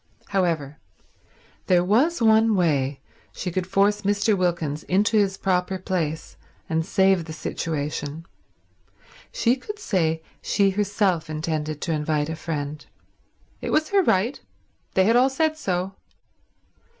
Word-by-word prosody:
However, 165 -7 -1 0.9
there 180 -2 +4
was 245 - +2
one 220 0 +5
way 140 -6 +1 0.3
she 180 - -4
could 185 +1 -2
force 200 +2 +2
Mr. 205 +1 +2
Wilkins 170 -5 -1
into 205 +4 +2
his 195 -2 +2
proper 185 0 0
place 165 -4 -3 0.3
and 160 0 0
save 190 -1 +2
the 160 - -7
situation: 150 0 -4 1.1
she 240 +1 +2
could 415 +11 -8
say 165 - 0 0.2
she 200 -1 +2
herself 195 -4 0
intended 155 -1 -3
to 170 - -2
invite 150 0 0
a 160 - -3
friend. 150 -2 -4 0.8
It - - -4
was 310 0 +1
her 400 -1 +4
right. 230 - +1 0.5
They 190 - +5
had 225 +4 +3
all 255 +2 +5
said 310 +3 0
so. 190 - -2
185 Hz, 130 wpm, -24 LUFS, 160-205 Hz, 1.1 s, one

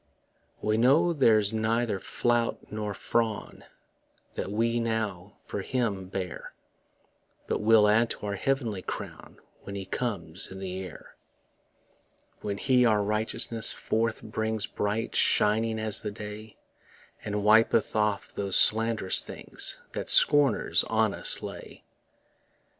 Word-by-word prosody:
We 110 0 +1
know 145 +9 +3
there's 110 -8 +3
neither 110 -1 0
flout 120 +4 -2
nor 105 -1 -4
frown 110 -1 -2 0.7
That - - -5
we 115 +2 0
now 110 -5 -3
for 100 - -5
him 105 -5 -2
bear, 95 -1 -6 0.9
But - - -2
will 110 -1 +5
add 115 +2 +3
to - - -5
our 100 - -3
heavenly 115 -2 -2
crown - - -8 0.2
When 100 - -8
he 100 -1 -5
comes 95 -6 -4
in 95 - -8
the 95 -1 -5
air 90 -3 -11 1.3
When 100 -1 -4
he 125 0 +2
our 110 -3 +3
righteousness 110 +2 0
forth 110 0 -2
brings 110 -1 -2
Bright 105 +3 -3
shining 110 +1 +3
as 110 -2 +3
the 105 - -4
day, 105 +1 -9 0.7
And 105 -1 -3
wipeth 110 +1 +3
off 105 -2 -1
those 100 -2 -2
sland'rous 110 -3 +3
things - - -1
That - - -6
scorners 145 -6 +5
on - - +1
us - - +1
lay. - - -9
110 Hz, 125 wpm, -27 LUFS, 100-115 Hz, 1.3 s, will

